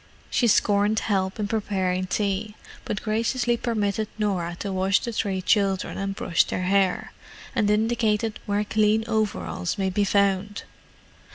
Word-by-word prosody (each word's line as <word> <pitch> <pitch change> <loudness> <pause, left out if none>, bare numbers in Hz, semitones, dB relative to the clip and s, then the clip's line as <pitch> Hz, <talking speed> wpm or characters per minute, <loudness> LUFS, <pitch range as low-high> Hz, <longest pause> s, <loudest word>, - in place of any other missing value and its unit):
She 240 - +2
scorned 205 0 +3
help 190 -1 -1
in 210 - -1
preparing 190 -4 -1
tea, 205 +2 -1 0.3
but 205 - -3
graciously 235 +2 +1
permitted 215 -3 -1
Norah 185 -5 -1
to 200 -1 -3
wash 190 +1 +2
the 235 - -4
three 195 -4 -2
children 195 -1 +1
and 195 0 -2
brush 170 - +2
their 185 - -3
hair, 190 0 +1 0.4
and 215 -5 +1
indicated 220 0 +1
where 205 0 +1
clean 215 +1 +2
overalls 90 - -1
might 190 -2 -1
be 205 - +2
found. 200 0 +1
205 Hz, 145 wpm, -25 LUFS, 190-215 Hz, 0.4 s, scorned